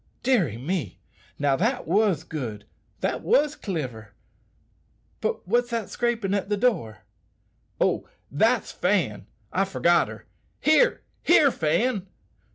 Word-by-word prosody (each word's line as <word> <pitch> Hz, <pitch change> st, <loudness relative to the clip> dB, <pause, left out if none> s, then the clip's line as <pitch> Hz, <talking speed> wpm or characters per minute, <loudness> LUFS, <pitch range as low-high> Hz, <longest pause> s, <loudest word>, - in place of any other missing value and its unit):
"Deary 190 Hz, -, +2 dB
me! 135 Hz, -, -3 dB, 0.4 s
now 140 Hz, -1 st, +2 dB
that 230 Hz, -, 0 dB
was 190 Hz, -3 st, +2 dB
good, 115 Hz, -11 st, -6 dB, 0.4 s
that -, -, -1 dB
was 300 Hz, -, +2 dB
cliver. 125 Hz, -, -5 dB, 1.0 s
But -, -, -3 dB
what's 240 Hz, +4 st, +2 dB
that 230 Hz, -3 st, -3 dB
scraping 235 Hz, -5 st, -1 dB
at 200 Hz, 0 st, -1 dB
the 205 Hz, -, +1 dB
door?" 115 Hz, -, 0 dB, 0.8 s
"Oh! -, -, +1 dB, 0.2 s
that's -, -, +2 dB
Fan; -, -, 0 dB, 0.3 s
I 195 Hz, -, +2 dB
forgot 175 Hz, -3 st, +2 dB
her. -, -, -10 dB, 0.3 s
Here! 395 Hz, +12 st, +3 dB, 0.2 s
here! 300 Hz, -5 st, +5 dB
Fan! 195 Hz, +6 st, 0 dB
195 Hz, 120 wpm, -25 LUFS, 145-240 Hz, 1.0 s, here